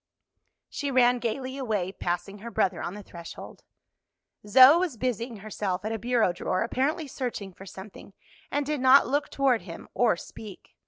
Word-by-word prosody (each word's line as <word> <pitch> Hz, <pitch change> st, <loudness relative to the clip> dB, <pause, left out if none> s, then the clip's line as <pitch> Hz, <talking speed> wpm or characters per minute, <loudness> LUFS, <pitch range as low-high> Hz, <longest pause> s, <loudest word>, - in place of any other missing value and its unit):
She 285 Hz, -, -4 dB
ran 250 Hz, -2 st, +4 dB
gayly 260 Hz, +3 st, -3 dB
away, 210 Hz, -8 st, -1 dB
passing 195 Hz, +2 st, -4 dB
her 235 Hz, +3 st, -7 dB
brother 190 Hz, -4 st, 0 dB
on 180 Hz, -, -4 dB
the 210 Hz, -, -9 dB
threshold. 170 Hz, -2 st, -10 dB, 0.9 s
Zoe 260 Hz, +9 st, +8 dB
was 345 Hz, -9 st, -2 dB
busying 235 Hz, 0 st, -2 dB
herself 200 Hz, -3 st, -3 dB
at 215 Hz, -, -2 dB
a 225 Hz, -, -3 dB
bureau 235 Hz, -4 st, +1 dB
drawer, 185 Hz, +2 st, -1 dB
apparently 280 Hz, +7 st, -1 dB
searching 245 Hz, -8 st, -5 dB
for 190 Hz, +2 st, -13 dB
something, 195 Hz, +1 st, -11 dB, 0.4 s
and 290 Hz, 0 st, -1 dB
did 295 Hz, -2 st, -2 dB
not 265 Hz, +2 st, +7 dB
look 285 Hz, +2 st, -1 dB
toward 265 Hz, -5 st, +2 dB
him 170 Hz, -2 st, -10 dB
or 235 Hz, -7 st, +2 dB
speak. 205 Hz, +2 st, -11 dB
230 Hz, 165 wpm, -27 LUFS, 195-260 Hz, 0.9 s, Zoe